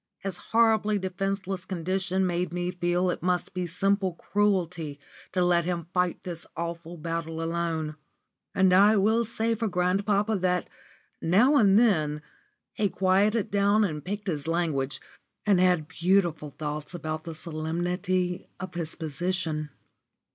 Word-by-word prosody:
His 195 -3 -5
horribly 220 -2 +2
defenceless 190 0 -3
condition 185 +1 -1
made 180 0 -1
me 175 0 -2
feel 175 +1 +1
it - - -5
must 180 +2 0
be 180 -1 -2
simple 195 +1 +1
cruelty 175 -7 -1 0.3
to 180 -1 +1
let 175 -1 +3
him 170 -1 -3
fight 180 -1 0
this 170 -2 -6
awful 170 0 -5
battle 165 0 -4
alone. 165 -2 -2 0.6
And 190 -1 +4
I 205 +3 +6
will 220 +4 +3
say 230 +1 0
for 225 0 -1
grandpapa 200 +3 +1
that, 180 -1 0 0.5
now 220 - +4
and 205 -7 +6
then, 155 -10 +2 0.5
he 205 -2 +1
quieted 195 +4 +2
down 205 +1 +3
and 155 -7 -2
picked 205 +4 -4
his 155 -6 -3
language, 145 -6 0 0.5
and 200 -3 +4
had 180 -4 +3
beautiful 170 -3 +1
thoughts 150 +2 -4
about 155 -1 -4
the 165 -2 -7
solemnity 175 +3 -2
of 185 - -6
his 165 -2 -3
position. 160 0 -2
180 Hz, 140 wpm, -27 LUFS, 165-195 Hz, 0.6 s, I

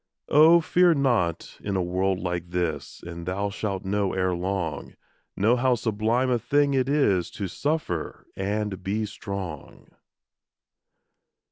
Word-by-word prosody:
Oh, 160 +3 +7
fear 175 +1 +4
not 120 - 0
in 100 -1 -2
a 95 - +1
world 95 +2 0
like 90 -1 -3
this, 85 -5 -3
And 85 0 -8
thou 100 +2 -1
shalt 100 -2 -3
know 100 0 0
ere 95 -1 +1
long, 90 -4 -3 0.4
Know 110 +5 +4
how 125 0 +2
sublime 115 +3 0
a 120 - +2
thing 140 +4 +2
it 130 -1 +1
is 105 - +2
To 100 - -5
suffer 145 - -3
and 100 -1 -2
be 105 +3 -1
strong. 95 -7 -7
100 Hz, 135 wpm, -25 LUFS, 90-125 Hz, 0.4 s, Oh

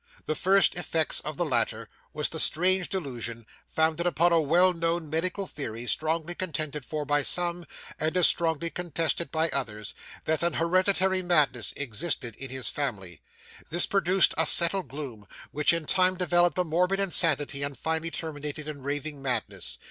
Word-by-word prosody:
The - - -1
first 195 +5 +3
effects 165 -3 +1
of 150 0 -7
the 175 - 0
latter 115 -5 -1 0.2
was 150 0 -1
the 160 - -5
strange 180 +4 +4
delusion, 120 - -4 0.2
founded 160 +2 0
upon 175 0 +2
a 165 - +4
well 175 +5 +3
known 165 -2 -2
medical 185 +5 -1
theory, 120 -8 -6
strongly 160 +5 0
contended 155 -6 -4
for 150 -1 -4
by 145 +1 +1
some, 175 +3 0 0.3
and 155 +3 -1
as 180 - +5
strongly 165 0 +2
contested 170 -1 -2
by 160 0 +1
others, 105 -7 -3 0.3
that 160 0 0
an 170 0 +1
hereditary 185 +2 +1
madness 150 - +2
existed 130 -2 -2
in 135 - -6
his 130 0 -2
family. 100 - -4 0.5
This 175 +2 +1
produced 190 -1 +2
a 160 - +3
settled 180 +2 +5
gloom, 130 -8 -8 0.2
which 150 +1 +3
in 165 -2 -1
time 185 +3 +2
developed 175 -1 +1
a 180 - +2
morbid 180 +4 0
insanity, 155 -7 +2
and 140 -1 -3
finally 160 +1 -2
terminated 150 -2 -6
in 150 -2 -7
raving 145 +1 -4
madness. 130 -2 -2
160 Hz, 165 wpm, -26 LUFS, 145-175 Hz, 0.5 s, as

